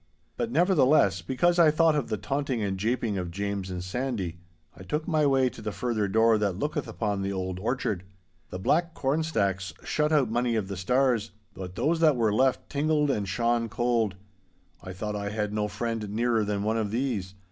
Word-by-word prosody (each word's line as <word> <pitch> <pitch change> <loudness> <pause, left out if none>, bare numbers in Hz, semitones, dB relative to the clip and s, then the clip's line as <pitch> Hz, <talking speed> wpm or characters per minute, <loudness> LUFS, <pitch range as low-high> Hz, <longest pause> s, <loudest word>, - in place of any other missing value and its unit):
'But, 235 - -2
nevertheless, 150 - +4
because 170 - +1
I 165 -2 +7
thought 160 +1 +3
of 145 -4 -1
the 110 - -1
taunting 135 +3 -2
and 100 -1 -1
japing 110 0 -1
of 90 -1 -4
James 100 +1 -3
and 90 -1 -4
Sandy, 95 -5 -3 0.4
I - - -13
took 150 +11 -3
my 155 -4 +2
way 135 -2 +3
to - - -11
the 105 0 -3
further 110 0 -1
door 110 +2 +4
that 100 -4 0
looketh 150 +3 -2
upon 105 -3 -2
the 100 0 -2
old 95 -1 -3
orchard. 110 -3 -1 0.5
The - - -5
black 165 - +1
corn 140 +4 0
stacks 95 - -1
shut 150 0 0
out 140 -7 +3
many 120 0 +1
of 105 -3 -2
the 100 - -4
stars, 120 +3 +1 0.2
but 90 -1 -8
those 160 - +1
that 155 -3 +5
were 115 -4 +1
left 130 +4 +2
tingled 150 0 +1
and 100 -6 -2
shone 115 +2 0
cold. 115 -4 0 0.7
I 95 - -8
thought 105 +3 -4
I 100 0 -3
had 105 0 -2
no 105 -1 0
friend 110 0 -3
nearer 115 +1 +1
than 100 -1 -2
one 110 +2 0
of 110 -2 -1
these. 110 -5 -2
115 Hz, 200 wpm, -27 LUFS, 100-135 Hz, 0.7 s, I